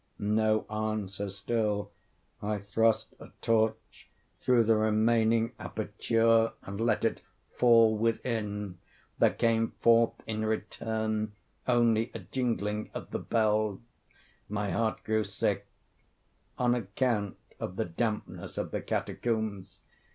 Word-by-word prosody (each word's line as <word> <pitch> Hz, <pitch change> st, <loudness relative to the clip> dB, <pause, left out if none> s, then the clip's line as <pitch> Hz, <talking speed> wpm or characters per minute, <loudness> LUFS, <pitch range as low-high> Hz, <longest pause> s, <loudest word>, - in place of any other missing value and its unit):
No 110 Hz, +1 st, +2 dB
answer 105 Hz, -2 st, -3 dB
still. 105 Hz, +1 st, -1 dB, 0.5 s
I 105 Hz, 0 st, -1 dB
thrust 110 Hz, +3 st, +1 dB
a -, -, -10 dB
torch 110 Hz, -1 st, 0 dB, 0.3 s
through 125 Hz, -2 st, +4 dB
the 115 Hz, 0 st, +4 dB
remaining 110 Hz, +1 st, +3 dB
aperture 115 Hz, 0 st, +1 dB
and 100 Hz, +2 st, -5 dB
let 115 Hz, -, +2 dB
it -, -, 0 dB, 0.3 s
fall 115 Hz, -2 st, +6 dB
within. 105 Hz, -4 st, -2 dB, 0.4 s
There -, -, +6 dB
came 115 Hz, -1 st, +1 dB
forth 115 Hz, 0 st, +5 dB
in 110 Hz, -1 st, -2 dB
return 110 Hz, 0 st, -2 dB, 0.3 s
only 115 Hz, -2 st, +3 dB
a -, -, -1 dB
jingling 105 Hz, 0 st, -2 dB
of -, -, -6 dB
the -, -, -2 dB
bells. 110 Hz, -3 st, +1 dB, 0.7 s
My 105 Hz, -1 st, -2 dB
heart 110 Hz, -1 st, -1 dB
grew 110 Hz, 0 st, +1 dB
sick—on 105 Hz, +4 st, -4 dB
account 110 Hz, -2 st, -1 dB, 0.2 s
of 90 Hz, -, -4 dB
the -, -, -1 dB
dampness 105 Hz, +6 st, -3 dB
of -, -, -3 dB
the -, -, -2 dB
catacombs. 105 Hz, -5 st, -2 dB
110 Hz, 115 wpm, -30 LUFS, 105-115 Hz, 0.7 s, fall